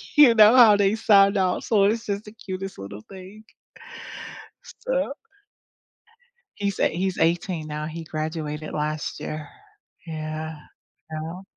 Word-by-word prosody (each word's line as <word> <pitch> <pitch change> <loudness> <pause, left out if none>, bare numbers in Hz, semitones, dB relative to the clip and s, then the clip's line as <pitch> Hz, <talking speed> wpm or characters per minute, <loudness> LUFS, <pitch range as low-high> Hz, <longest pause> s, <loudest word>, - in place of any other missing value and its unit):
You 285 -6 +8
know 215 +2 +7
how 230 -4 +8
they 205 +1 +2
sound 200 -2 +5
out 185 -1 0
so 210 -3 +3
it's 225 +3 +1
just 200 +1 -3
the 210 - -10
cutest 195 - -7
little 100 +2 -8
thing. 195 +3 -12 1.2
So - - -3 1.4
He's 200 -1 -2
eigh - - +3
he's 185 +2 -2
18 170 -1 0
now, 150 0 -4
he 165 +1 -6
graduated 155 -1 -4
last 150 0 -3
year 155 -1 -6 0.6
yeah. 155 0 -5 0.5
You 155 - -4
know 170 +4 -7
185 Hz, 135 wpm, -24 LUFS, 155-205 Hz, 1.4 s, You